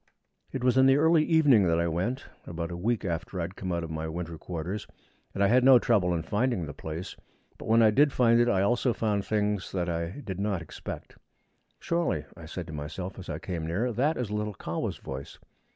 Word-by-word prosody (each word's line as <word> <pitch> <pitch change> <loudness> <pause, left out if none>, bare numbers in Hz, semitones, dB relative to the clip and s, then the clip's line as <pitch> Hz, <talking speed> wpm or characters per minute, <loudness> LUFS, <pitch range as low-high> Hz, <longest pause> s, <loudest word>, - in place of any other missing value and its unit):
It 130 - -4
was 125 0 +3
in 130 - +6
the 135 +1 +5
early 160 +1 +4
evening 145 - +5
that 85 0 +2
I 85 - +1
went, 95 - -2 0.2
about 85 0 -4
a - - -4
week 105 +4 -1
after 90 +2 -3
I - - 0
had 90 +3 -6
come 95 -1 -4
out 85 -1 -1
of 80 - -6
my 80 0 -3
winter 85 +1 -5
quarters, 90 +4 -5 0.4
and 100 - 0
I - - +5
had 125 +4 +4
no 130 -1 +8
trouble 105 -7 +2
in 80 - -2
finding 105 +1 0
the 75 - -7
place; 80 +5 -6 0.4
but - - -8
when 115 +1 +5
I 110 - +6
did 145 +6 +4
find 120 -2 +4
it 120 0 +4
I 95 -2 +2
also 120 +3 +2
found 105 -3 0
things 105 -2 -1
that 90 -2 -1
I 85 +10 -3
did 95 -2 -5
not 100 -2 0
expect. 80 - -8 0.6
'Surely,' 170 0 -1
I - - -11
said - - -5
to - - -9
myself 80 +7 -6
as 95 - -9
I - - -3
came 85 -4 -4
near, 110 +9 -1
'that 140 +8 +1
is 120 -5 -3
little 105 -1 -2
Kahwa's - - -3
voice!' 65 +1 -8
100 Hz, 225 wpm, -28 LUFS, 85-120 Hz, 0.6 s, no